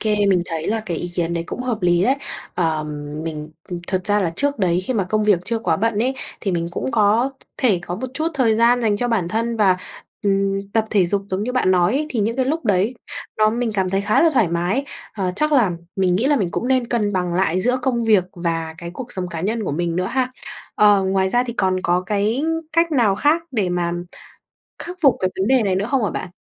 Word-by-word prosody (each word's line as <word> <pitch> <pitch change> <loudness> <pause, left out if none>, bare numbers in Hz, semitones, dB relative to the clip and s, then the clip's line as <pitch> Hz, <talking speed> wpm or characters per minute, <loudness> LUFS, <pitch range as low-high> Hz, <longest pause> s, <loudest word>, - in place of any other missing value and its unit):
kê, 210 -2 +1
mình 190 -3 +3
thấy 160 -1 -4
là 225 +1 0
cái 180 -6 -4
ý 175 - -4
kiến 170 -1 -1
đấy 170 0 -2
cũng - - -5
hợp 235 -6 -3
lý 175 0 +3
đấy. 265 +5 +3 0.4
Ờm, 160 -3 0 0.4
mình 155 -1 -5 0.4
thực 185 -1 -1
ra 205 -1 +2
là 170 - 0
trước 285 +9 0
đấy 180 -2 +2
khi 260 - -1
mà 200 - +1
công 215 +3 0
việc 205 -5 +4
chưa 230 -1 0
quá 170 -7 0
bận 220 +2 0
ấy 260 +2 0 0.3
thì 200 - -1
mình 170 -1 -1
cũng 185 - -3
có 225 +4 +3 0.3
thể 225 -9 +3
có 175 - -4
một 255 +7 -4
chút 315 +3 0
thời 235 -5 +3
gian 240 +1 +4
dành 210 -2 +2
cho 245 +3 -1
bản 200 -7 0
thân 230 +4 -1
và, 195 -4 +4 0.5
ừm, 195 0 0
tập 220 -1 +1
thể 200 -4 +3
dục 200 +2 0
giống 190 +1 -2
như 250 - -2
bạn 250 -7 +2
nói 180 +2 +3
ấy 300 +3 0
thì 230 - -1
những 230 +4 0
cái 260 - +1
lúc 315 +4 -2
đấy 205 +3 +1 0.4
nó 215 0 +4
mình 235 0 -1
cảm 190 -2 +1
thấy 195 +1 +1
khá 210 +8 +2
là 330 - +5
thoải 215 -9 +3
mái. 175 +11 0 0.3
Ờ, 185 -3 -2
chắc 305 0 +2
là 240 -10 +4 0.3
mình 185 -2 +2
nghĩ 230 +7 +1
là 290 0 +3
mình 185 -7 0
cũng 245 - -2
nên 255 -2 +2
cân 210 -4 0
bằng 180 -2 -1
lại 185 -1 +1
giữa 250 +5 +1
công 240 -3 0
việc 210 -5 +4
và 165 -2 -3
cái 170 -1 -7
cuộc 250 -2 -7
sống 185 -1 -3
cá 170 -2 -5
nhân 215 +5 -1
của 145 - -2
mình 170 +2 -1
nữa 185 +1 0
ha. 255 +1 -1 0.4
Ờ, 205 -2 +5
ngoài 190 0 +1
ra 245 +5 +3
thì 235 - -4
còn 190 -5 +1
có 175 +1 +2
cái 215 +6 0 0.3
cách 335 -1 +2
nào 230 -8 +3
khác 300 +10 +2
để 210 -8 0
mà 175 -1 -1 0.9
khắc 355 +1 -7
phục 275 -5 +5
cái 185 - +1
vấn 190 - +1
đề 260 -3 +4
này 195 -2 +1
nữa 195 +2 0
không 270 -4 +2
hả 205 - +1
bạn? 185 - -5
205 Hz, 250 wpm, -21 LUFS, 180-240 Hz, 0.9 s, là